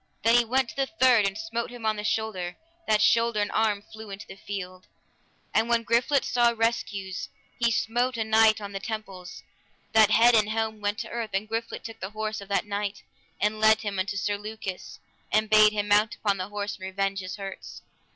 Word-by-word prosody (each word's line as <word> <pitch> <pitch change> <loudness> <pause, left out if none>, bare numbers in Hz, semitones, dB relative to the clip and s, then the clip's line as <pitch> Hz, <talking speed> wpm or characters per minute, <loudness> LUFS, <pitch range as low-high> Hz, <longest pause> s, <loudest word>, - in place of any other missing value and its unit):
Then 230 +1 +4
he 240 - +6
went 255 +2 +1
to - - -10
the 270 -1 0
third 255 -9 +4
and 195 +1 -4
smote 230 +2 -3
him 245 -2 -9
on 215 0 +2
the 210 - -5
shoulder, 210 -5 -2 0.3
that 210 -1 +3
shoulder 230 0 +3
and 205 - 0
arm 215 -2 +1
flew 220 0 -11
in 195 0 -7
the - - -10
field. 185 -2 -7 0.7
And 225 +2 +2
when 235 -1 +2
Griflet 240 +5 +2
saw 240 -1 +2
rescues, 200 -4 -2 0.3
he 235 -1 +3
smote 235 +3 0
a 225 - 0
knight 220 0 +4
on 200 -1 -7
the 195 - -4
temples, 195 -4 -7 0.5
that 220 -2 +6
head 235 +2 +6
and 215 -2 +4
helm 220 -1 -2
went 205 +1 -1
to - - -6
the - - -10
earth, 235 -2 -3
and 200 +2 -1
Griflet 225 +1 -4
took 225 -1 -9
the 190 - -5
horse 215 -1 -3
of 200 - -10
that 200 - +1
knight, 200 -1 -4 0.4
and 210 +1 0
led 220 0 +5
him 205 -3 -3
unto 200 +2 -2
Sir 205 0 -1
Lucas, 210 -3 -7 0.3
and 215 0 +1
bade 215 0 +7
him 205 -1 -2
mount 210 +2 +3
upon 200 -2 0
the 185 +1 -4
horse 205 0 -4
and 185 - -8
revenge 195 +1 -1
his 185 0 -6
hurts. 195 -2 -8
215 Hz, 215 wpm, -26 LUFS, 200-225 Hz, 0.7 s, bade